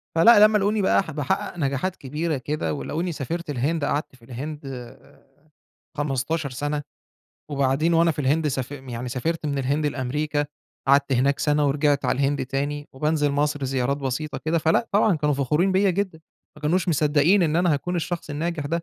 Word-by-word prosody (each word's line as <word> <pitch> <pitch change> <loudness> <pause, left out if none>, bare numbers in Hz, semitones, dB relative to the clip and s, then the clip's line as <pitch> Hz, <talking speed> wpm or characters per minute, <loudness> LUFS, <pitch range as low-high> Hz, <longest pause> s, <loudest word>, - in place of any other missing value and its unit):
فلأ 210 +5 +8
لمّا 215 0 +2
لقوني 205 +1 +1
بقى 195 - +3
ح 160 - -8
باحقّق 150 +3 -2
نجاحات 140 +5 -1
كبيرة 150 +3 -3
كده 150 +4 -2
ولقوني 165 +4 -3
سافرت 160 +3 -4
الهند 145 +3 0
قعدت 145 -2 -2
في 115 -2 -20
الهند 145 +4 -7
آآ 135 +2 -10 0.7
15 145 +1 -1
سَنة، 145 +3 -3 0.7
وبعدين 140 +4 +1
وأنا 165 0 +4
في 150 - -5
الهند 150 +3 +1
ساف 130 0 -3
يعني 125 -3 -6
سافرت 155 +5 -2
من 140 -1 -1
الهند 145 +3 0
لأمريكا، 145 +2 -1 0.4
قعدت 140 0 +4
هناك 135 +3 +2
سَنة 150 -1 +2
ورجِعت 145 0 +1
على - - +1
الهند 140 -1 0
تاني، 145 +2 -3
وبانزِل 150 +1 +1
مصر 145 0 0
زيارات 135 +1 0
بسيطة 140 +2 -3
كده، 165 +1 0
فلأ 160 +9 +2
طبعًا 205 -3 +4
كانوا 150 -1 +1
فخورين 150 +8 +1
بيّا 195 +1 +3
جدًا، 185 -3 -2 0.4
ما 150 - -15
كانوش 175 +4 +1
مصدّقين 155 +5 +3
إن 160 -1 +1
أنا 175 -2 +3
هاكُون 175 +5 -2
الشخص 170 -2 -3
الناجح 160 +1 -2
ده. 145 - -5
150 Hz, 175 wpm, -24 LUFS, 140-165 Hz, 0.7 s, فلأ